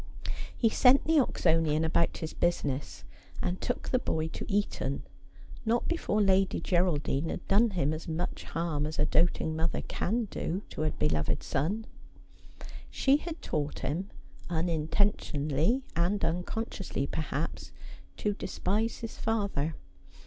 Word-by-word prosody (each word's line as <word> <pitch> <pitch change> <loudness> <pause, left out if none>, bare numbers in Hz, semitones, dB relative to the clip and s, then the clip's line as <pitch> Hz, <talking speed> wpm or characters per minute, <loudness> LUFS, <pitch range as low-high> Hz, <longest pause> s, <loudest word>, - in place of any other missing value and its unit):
He 230 - +4
sent 250 +4 +6
the 320 -1 +5
Oxonian 160 - +2
about 165 +1 +2
his 160 - -5
business, 145 -5 -1 0.4
and 180 +1 -2
took 245 - -2
the 255 - +3
boy 160 -8 -1
to - - -6
Eton, 195 -9 0 0.6
not 235 +1 +1
before 215 -11 +1
Lady 190 -1 +3
Geraldine 165 -4 +1
had - - -5
done 220 +4 +5
him 155 -7 0
as 155 - -6
much 165 +2 -3
harm 160 -3 -1
as 155 - -5
a 150 - +3
doting 160 -1 +2
mother 160 +1 0
can 230 +4 -1
do 190 +5 -2
to - - -4
a 155 - +2
beloved 75 - 0
son. 195 +11 -1 1.0
She 275 +1 +4
had 330 +1 -7
taught 150 0 -2
him, 175 +8 -2 0.4
unintentionally 165 - +1
and 175 +5 +1
unconsciously, 180 - -2
perhaps, 155 +1 -3 0.5
to 210 - 0
despise 210 +3 -1
his 230 -1 -6
father. 200 -9 0
175 Hz, 135 wpm, -30 LUFS, 155-210 Hz, 1.0 s, sent